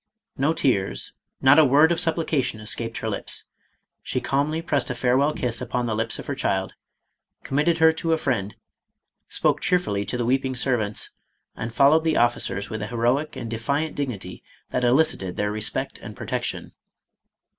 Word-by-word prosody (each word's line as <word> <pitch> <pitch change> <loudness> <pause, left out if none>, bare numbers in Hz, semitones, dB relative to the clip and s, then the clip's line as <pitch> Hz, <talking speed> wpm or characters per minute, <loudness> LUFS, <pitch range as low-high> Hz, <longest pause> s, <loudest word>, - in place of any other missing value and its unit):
No 145 +4 +2
tears, 125 -11 0 0.3
not 140 +4 +7
a - - +8
word 150 +4 +5
of 170 - +1
supplication 160 -8 0
es 110 +1 -1
caped 115 -1 -5
her - - -4
lips. 110 - -4 0.6
She - - -2
calmly 145 +3 0
pressed 145 -6 0
a 125 - -2
farewell 130 +4 +2
kiss 120 -5 -2
upon 125 0 -2
the 115 - -1
lips 115 +1 -1
of - - -8
her - - -3
child, 95 0 -1 0.7
committed 150 +5 +1
her 160 0 +6
to 165 +1 -2
a 160 - +3
friend* 115 -9 -2 0.7
spoke - - +1
cheerfully 105 - +1
to 125 - -3
the 120 - -1
weeping 130 +1 +1
servants, 120 -5 -1 0.4
and 115 +1 -5
followed 145 +6 +5
the 160 -1 +1
officers 120 -4 +1
with 110 -1 -5
a 105 - -3
heroic 125 +6 0
and 115 -2 -6
defiant 140 +7 -1
dignity 105 -10 -4 0.3
that 125 - -1
eli 125 +6 +5
cited 95 - -2
their 105 0 -1
respect 105 0 -3
and - - -9
protection. - - -4
125 Hz, 175 wpm, -24 LUFS, 110-150 Hz, 0.7 s, a